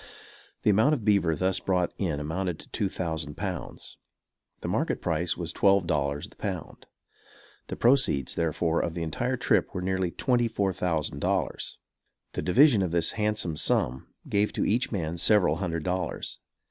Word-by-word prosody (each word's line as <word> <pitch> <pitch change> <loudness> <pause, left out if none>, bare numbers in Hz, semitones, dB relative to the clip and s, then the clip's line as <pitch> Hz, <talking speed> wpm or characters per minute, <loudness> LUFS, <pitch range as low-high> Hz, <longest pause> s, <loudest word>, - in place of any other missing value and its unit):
The 105 - +5
amount 110 +10 +4
of 115 -7 -7
beaver 100 -6 +3
thus 95 +4 0
brought 90 -2 0
in 80 -7 -1
amounted 85 +3 -2
to - - -15
two 100 - -1
thousand 80 -5 -4
pounds. 95 -3 -6 0.6
The - - -4
market - - 0
price 85 +1 -1
was 85 -1 -2
twelve 100 -2 +4
dollars 75 -4 -1
the - - -20
pound. - - -6 0.8
The - - -4
proceeds, 120 - +2
therefore, 85 0 0
of 85 - -2
the 85 - -2
entire 125 +11 -1
trip 120 - +1
were 90 - -2
nearly 95 -1 0
twenty 120 +5 +1
four 100 -4 0
thousand 80 -5 -1
dollars. - - -2 0.6
The - - -2
division 120 +3 +5
of 95 - 0
this 85 0 +2
handsome 105 -7 -1
sum 65 -2 +1 0.2
gave 105 +1 +1
to - - 0
each 120 +5 +1
man 85 -5 -2
several 90 -4 +4
hundred 85 -4 -2
dollars. 90 +1 -3
90 Hz, 165 wpm, -27 LUFS, 80-100 Hz, 0.8 s, The